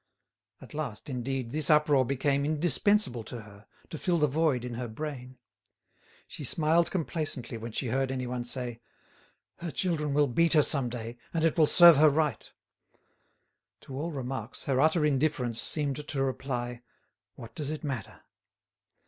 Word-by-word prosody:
At -, -, -13 dB
last, 145 Hz, -2 st, -5 dB
indeed, 130 Hz, -1 st, -3 dB
this 155 Hz, +1 st, +1 dB
uproar 150 Hz, -3 st, +4 dB
became 140 Hz, +2 st, 0 dB
indispensable 155 Hz, -, +2 dB
to 120 Hz, -, -7 dB
her, 100 Hz, 0 st, -16 dB, 0.2 s
to 155 Hz, -, -6 dB
fill 175 Hz, -2 st, +1 dB
the 150 Hz, -, +3 dB
void 145 Hz, -4 st, 0 dB
in 125 Hz, -, -5 dB
her 120 Hz, +1 st, -4 dB
brain. 130 Hz, +1 st, -7 dB, 0.9 s
She 150 Hz, -, -8 dB
smiled 160 Hz, +5 st, +2 dB
complacently 155 Hz, -8 st, -3 dB
when 115 Hz, +1 st, -7 dB
she 120 Hz, +2 st, -2 dB
heard 135 Hz, +2 st, 0 dB
anyone 125 Hz, -1 st, -3 dB
say, 120 Hz, -2 st, -5 dB, 0.8 s
"Her 170 Hz, -, -4 dB
children 150 Hz, -4 st, -1 dB
will 150 Hz, 0 st, +4 dB
beat 165 Hz, +6 st, +2 dB
her 150 Hz, -2 st, +5 dB
some 135 Hz, -4 st, +2 dB
day, 120 Hz, 0 st, -7 dB, 0.2 s
and 160 Hz, -, +1 dB
it 165 Hz, -, +2 dB
will 155 Hz, -3 st, +4 dB
serve 170 Hz, -2 st, +8 dB
her 155 Hz, +1 st, +7 dB
right." 150 Hz, -5 st, -1 dB, 1.3 s
To 130 Hz, -, -10 dB
all 155 Hz, +5 st, -3 dB
remarks, 135 Hz, -3 st, -5 dB
her 135 Hz, -1 st, +1 dB
utter 155 Hz, +1 st, +3 dB
indifference 135 Hz, -5 st, 0 dB
seemed 150 Hz, -1 st, -1 dB
to 135 Hz, -3 st, -1 dB
reply, 125 Hz, -2 st, -3 dB, 0.5 s
"What 115 Hz, -3 st, -11 dB
does 145 Hz, -2 st, -4 dB
it 155 Hz, +1 st, -5 dB
matter?" 135 Hz, -6 st, -5 dB
140 Hz, 155 wpm, -29 LUFS, 125-155 Hz, 1.3 s, serve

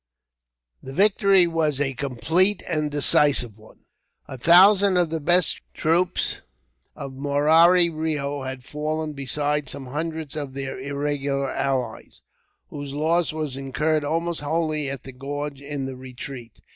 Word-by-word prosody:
The 135 Hz, -, -9 dB
victory 195 Hz, 0 st, +4 dB
was 160 Hz, -4 st, 0 dB
a 135 Hz, -2 st, 0 dB
complete 160 Hz, -, +1 dB
and 155 Hz, -3 st, -1 dB
decisive 140 Hz, -6 st, +2 dB
one. 110 Hz, -, -19 dB, 0.5 s
A -, -, -7 dB
thousand 185 Hz, -, +6 dB
of 175 Hz, -3 st, +1 dB
the 165 Hz, -, -2 dB
best 175 Hz, +2 st, +2 dB
troops 175 Hz, +3 st, 0 dB, 0.5 s
of 135 Hz, -, -7 dB
Murari 155 Hz, +6 st, +4 dB
Reo 150 Hz, -3 st, -3 dB
had 130 Hz, -1 st, -6 dB
fallen, 155 Hz, +2 st, -3 dB
besides 145 Hz, +1 st, -1 dB
some 140 Hz, -1 st, -5 dB
hundreds 155 Hz, +2 st, -5 dB
of 140 Hz, -3 st, -5 dB
their 135 Hz, -1 st, -5 dB
irregular 140 Hz, 0 st, -2 dB
allies, 130 Hz, -5 st, -3 dB, 0.5 s
whose 145 Hz, -1 st, -7 dB
loss 165 Hz, +3 st, +1 dB
was 155 Hz, -4 st, -4 dB
incurred 150 Hz, +3 st, -1 dB
almost 165 Hz, +2 st, -2 dB
wholly 155 Hz, -1 st, -1 dB
at 135 Hz, -2 st, -6 dB
the 135 Hz, -, -9 dB
gorge 140 Hz, +2 st, -6 dB
in 140 Hz, -1 st, -5 dB
the 135 Hz, 0 st, -6 dB
retreat. 125 Hz, -2 st, -9 dB
145 Hz, 135 wpm, -23 LUFS, 135-160 Hz, 0.5 s, thousand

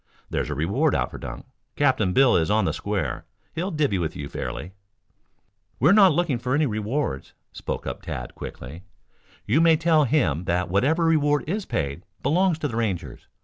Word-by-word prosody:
There's -, -, -1 dB
a 75 Hz, -, -3 dB
reward 100 Hz, -, +1 dB
out -, -, -1 dB
for -, -, -8 dB
Dunk. -, -, -8 dB, 0.3 s
Captain 130 Hz, -9 st, +2 dB
Bill 135 Hz, +6 st, +5 dB
is 80 Hz, -1 st, +2 dB
on 105 Hz, -1 st, +2 dB
the -, -, 0 dB
square. 95 Hz, -12 st, -3 dB, 0.3 s
He'll 170 Hz, +5 st, -2 dB
'divvy' 150 Hz, -, 0 dB
with 80 Hz, -3 st, -3 dB
you 70 Hz, -, -5 dB
fairly." 65 Hz, +8 st, -5 dB, 1.1 s
"We 150 Hz, +9 st, +5 dB
are -, -, +6 dB
not 200 Hz, -3 st, +7 dB
looking 150 Hz, -5 st, 0 dB
for 125 Hz, +2 st, -1 dB
any 150 Hz, +1 st, +2 dB
rewards," 110 Hz, -, -3 dB, 0.2 s
spoke -, -, -5 dB
up -, -, -5 dB
Tad -, -, -6 dB
quickly. 70 Hz, +8 st, -9 dB, 0.6 s
"You 160 Hz, -, +3 dB
may 165 Hz, -1 st, +5 dB
tell 160 Hz, -2 st, +3 dB
him 90 Hz, -, +1 dB
that 90 Hz, +1 st, 0 dB
whatever 150 Hz, -, +2 dB
reward 150 Hz, -2 st, +2 dB
is 195 Hz, +5 st, -3 dB
paid, 70 Hz, +1 st, -2 dB, 0.2 s
belongs 175 Hz, +4 st, +2 dB
to 155 Hz, -, -2 dB
the 115 Hz, -4 st, -5 dB
Rangers. 90 Hz, -, -3 dB
125 Hz, 185 wpm, -24 LUFS, -, 1.1 s, not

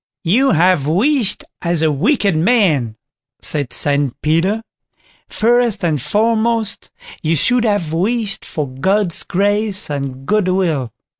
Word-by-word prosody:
"You 235 Hz, +11 st, +3 dB
have 165 Hz, -3 st, +3 dB
wished 225 Hz, -, +1 dB, 0.2 s
as 170 Hz, -2 st, 0 dB
a 155 Hz, -, +3 dB
wicked 200 Hz, -, +1 dB
man", 160 Hz, -, +2 dB, 0.4 s
said 145 Hz, -5 st, -3 dB
St 145 Hz, -3 st, -1 dB
Peter; 180 Hz, +8 st, +1 dB, 0.7 s
"first 235 Hz, -2 st, +1 dB
and 150 Hz, -5 st, 0 dB
foremost, 220 Hz, -, 0 dB, 0.3 s
you 160 Hz, +1 st, +1 dB
should 245 Hz, -, +2 dB
have 200 Hz, -8 st, 0 dB
wished 205 Hz, +4 st, -1 dB
for 150 Hz, -3 st, -4 dB
God's 175 Hz, +8 st, 0 dB
grace 205 Hz, -1 st, -1 dB
and 135 Hz, -2 st, -5 dB
goodwill." 185 Hz, -, 0 dB
185 Hz, 120 wpm, -17 LUFS, 150-220 Hz, 0.7 s, You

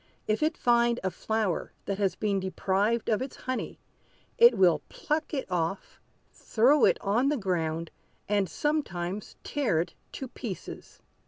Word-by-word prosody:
If 215 Hz, +5 st, +1 dB
it 315 Hz, +2 st, +1 dB
find 235 Hz, 0 st, +3 dB
a 190 Hz, -, 0 dB
flower 220 Hz, -5 st, -2 dB
that 200 Hz, 0 st, -3 dB
has 195 Hz, -2 st, +1 dB
been 200 Hz, -2 st, 0 dB
deprived 195 Hz, +4 st, 0 dB
of 220 Hz, +1 st, +1 dB
its 260 Hz, -, -5 dB
honey, 255 Hz, 0 st, -4 dB, 0.6 s
it 475 Hz, +1 st, +8 dB
will 170 Hz, -5 st, +4 dB
pluck 305 Hz, +1 st, -2 dB
it 275 Hz, -3 st, -2 dB
off, 180 Hz, +1 st, -3 dB, 0.3 s
throw 260 Hz, +7 st, +3 dB
it -, -, +4 dB
on 230 Hz, +6 st, +2 dB
the 295 Hz, -, +1 dB
ground, 165 Hz, -5 st, -2 dB, 0.4 s
and 200 Hz, -3 st, +1 dB
sometimes 205 Hz, -, -2 dB
tear 265 Hz, -, 0 dB
it 170 Hz, +1 st, -2 dB, 0.2 s
to 265 Hz, -, -5 dB
pieces." 230 Hz, -6 st, -8 dB
210 Hz, 150 wpm, -28 LUFS, 185-255 Hz, 0.6 s, it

